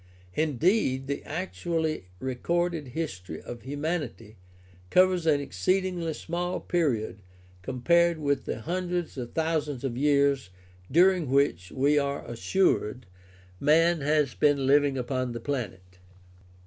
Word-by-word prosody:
Indeed, 155 - +1
the 140 +1 -3
actually 165 - -2
recorded 160 - -1
history 95 - -5
of 120 -1 -8
humanity 145 -6 -4 0.5
covers 185 -2 +4
an 150 -2 +4
exceedingly 170 - -1
small 175 +2 -3
period 125 - -1 0.4
compared 170 - +2
with 145 -2 -1
the - - -4
hundreds 175 +2 -2
of 125 -3 -6
thousands 155 -5 -1
of 130 -3 -2
years 140 -3 +2 0.4
during 175 -1 +4
which, 130 -10 +1
we 145 +3 +3
are 140 0 -2
assured, 125 - 0 0.5
man 165 +2 +4
has 150 -2 +2
been 145 -2 +2
living 140 0 +4
upon 130 -1 -2
the 120 - -5
planet. 95 -9 -5
145 Hz, 115 wpm, -27 LUFS, 130-170 Hz, 0.5 s, covers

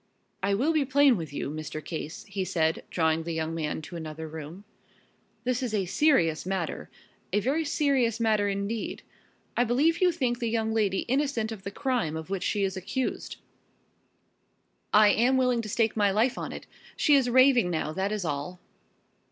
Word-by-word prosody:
"I 200 +1 +1
will 280 +10 +1
be 310 -2 +3
plain 280 -1 +4
with 165 -6 -5
you, 145 - -4
Mr. 155 0 -6
Case," 160 -1 -6
he 195 -1 -4
said, 160 -3 0
drawing 160 -1 +1
the 165 +1 -4
young 160 0 -2
man 155 -1 -3
to 175 - -9
another 160 -1 -6
room. 160 +4 -8 0.8
"This 250 0 0
is 240 -4 -2
a 195 -3 0
serious 175 - +2
matter 185 -3 -3 0.4
a 205 - +2
very 275 +10 0
serious 270 -6 +1
matter 215 -3 +2
indeed. 200 +3 -3 0.5
I 245 - +3
believe 285 +9 +2
you 365 -1 +5
think 250 -7 -1
the 235 -2 -1
young 220 -1 0
lady 205 -4 +1
innocent 260 -4 -1
of 220 -3 -7
the 195 - -5
crime 225 - -1
of 160 +4 -8
which 195 -2 -2
she 205 +1 0
is 190 0 -1
accused?" 210 +8 -3 1.6
"I 210 0 +7
am 245 +5 +3
willing 250 -2 +2
to 215 - -7
stake 225 0 +1
my 205 -2 +3
life 220 +6 +2
on - - -5
it. - - -8 0.3
She 295 - +4
is 270 -3 +4
raving 255 -5 +5
now, 160 -2 -2
that 190 +4 -1
is 210 -4 -2
all." 150 +4 -4
210 Hz, 185 wpm, -27 LUFS, 170-250 Hz, 1.6 s, I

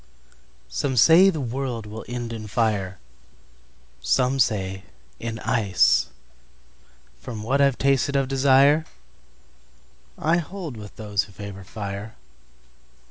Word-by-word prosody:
SOME 125 - -2
say 170 - +7
the 165 -5 -2
world 125 -3 -3
will 110 +1 -8
end 120 -1 -5
in 110 -2 -7
fire, 100 -4 -1 1.0
Some 130 +1 +1
say 95 -5 0 0.4
in 115 -1 -4
ice. 115 -5 +3 1.1
From 115 -4 -7
what 135 +5 +1
I've 140 -2 +3
tasted 140 +1 +1
of 135 -1 +2
desireI 135 +3 +4 1.6
hold 170 -4 -7
with 105 -2 -10
those 105 -3 -1
who - - -17
favor 100 0 -9
fire. 100 +2 -7
115 Hz, 110 wpm, -24 LUFS, 105-135 Hz, 1.6 s, say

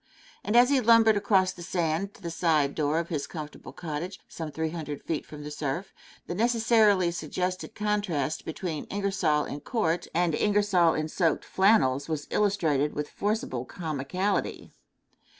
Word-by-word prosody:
And 210 - -1
as 245 +3 +6
he 275 -2 +4
lumbered 225 -1 +6
across 195 -2 +3
the 175 - -12
sand 175 +2 -1
to - - -18
the 170 - -4
side 155 -5 +2
door 150 0 0
of 170 0 -2
his 150 -4 -2
comfortable 150 -2 -8
cottage, 170 +3 -5
some 160 -2 -6
three 160 +1 -3
hundred 150 -4 -6
feet 160 -3 -3
from 150 -1 -9
the 150 - -6
surf, 150 +6 -4 0.3
the - - -4
necessarily 220 -4 +3
suggested 180 +3 -3
contrast 205 -9 -1
between 160 -1 -4
Ingersoll 195 -7 0
in 145 - -6
court 175 -4 -1
and 170 -1 +1
Ingersoll 200 -3 +3
in 155 0 -1
soaked 165 -1 0
flannels 180 -9 +3
was 150 -2 -2
illustrated 160 -9 +1
with 150 0 -4
forcible 205 - -2
comicality. 170 +7 -2
170 Hz, 155 wpm, -27 LUFS, 155-200 Hz, 0.3 s, as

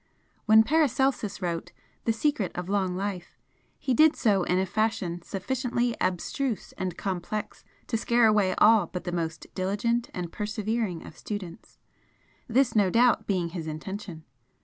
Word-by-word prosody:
When 220 0 +8
Paracelsus 265 -6 +1
wrote 170 -2 -3 0.3
'The 225 - +2
Secret 225 - 0
of 180 +1 -4
Long 190 -3 0
Life' 190 -3 -4 0.4
he 260 - -1
did 310 +4 +5
so 205 -5 +2
in 180 +1 +1
a 190 - +2
fashion 195 -4 -1
sufficiently 240 +5 -1
abstruse 220 +7 -1
and 185 -2 -4
complex 195 +2 -4 0.2
to 225 - -1
scare 235 +1 +3
away 205 -4 +3
all 215 -4 +6
but 180 - -6
the 175 - -3
most 165 -2 -3
diligent 210 +5 0
and 175 -2 -5
persevering 215 -3 -2
of - - -11
students, 185 -4 -7 0.7
this 255 +1 +2
no 205 -3 +4
doubt 230 +1 +3
being 180 -4 0
his 165 -2 -6
intention. 165 +1 -6
205 Hz, 150 wpm, -27 LUFS, 180-230 Hz, 0.7 s, When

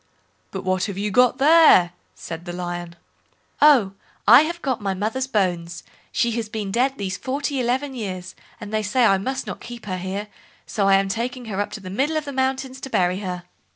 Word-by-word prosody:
"But 190 -1 -6
what 185 0 0
have 200 -2 -5
you 205 +1 -2
got 250 +4 +4
there?" 295 - +6 0.2
said 165 +1 -8
the 175 - -6
Lion. 175 -1 -5 0.7
"Oh! 270 -10 +6 0.4
I 240 +6 +9
have 340 +3 -2
got 260 -5 -1
my 195 -2 -1
mother's 225 +7 -2
bones—she 185 +2 -2
has 225 -1 -3
been 210 -3 -4
dead 260 +5 +1
these 195 -2 -3
forty 275 +1 -2
eleven 260 +3 -1
years, 185 -6 -5 0.3
and 210 -1 -8
they 215 - +1
say 225 +4 +2
I 195 -3 +4
must 265 +6 -3
not - - -6
keep 240 -2 -9
her 185 -2 -3
here, 195 +3 -4 0.4
so 200 -2 0
I 195 - +6
am 195 0 +2
taking 240 +4 -3
her 205 -2 -2
up 205 - -1
into 215 - -8
the 185 -1 -8
middle 285 +10 0
of 305 - -3
the 280 - -6
mountains 265 0 -2
to 270 - -6
bury 180 -4 +1
her." 180 -3 -5
215 Hz, 205 wpm, -22 LUFS, 190-260 Hz, 0.7 s, I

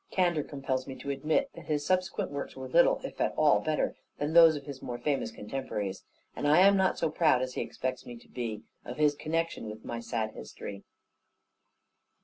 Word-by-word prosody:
Candour 175 -5 +1
compels 135 -2 -3
me 135 - -6
to 140 - -5
admit 155 - 0
that - - -11
his 150 -1 -1
subsequent 185 +2 0
works - - -5
were - - -6
little, - - +4
if - - -6
at - - +1
all, - - +5
better - - -1 0.2
than 145 +2 -2
those 165 -2 +8
of 140 -2 -7
his 140 -2 -8
more 120 -1 -5
famous 140 -4 -1
contemporaries; 105 -4 -4 0.3
and 145 - -1
I 155 +5 +6
am 200 +1 +7
not 190 -1 +2
so 160 - 0
proud, 155 -6 +3
as 130 0 -4
he - - -2
expects 130 -1 -4
me 120 - -9
to - - -18
be, 115 -4 -5 0.2
of 125 - -7
his 150 -1 +4
connexion 160 -4 -2
with 110 +1 -9
my 115 - -4
sad 115 -2 -2
history. 100 -1 -9
140 Hz, 200 wpm, -30 LUFS, 125-165 Hz, 0.3 s, those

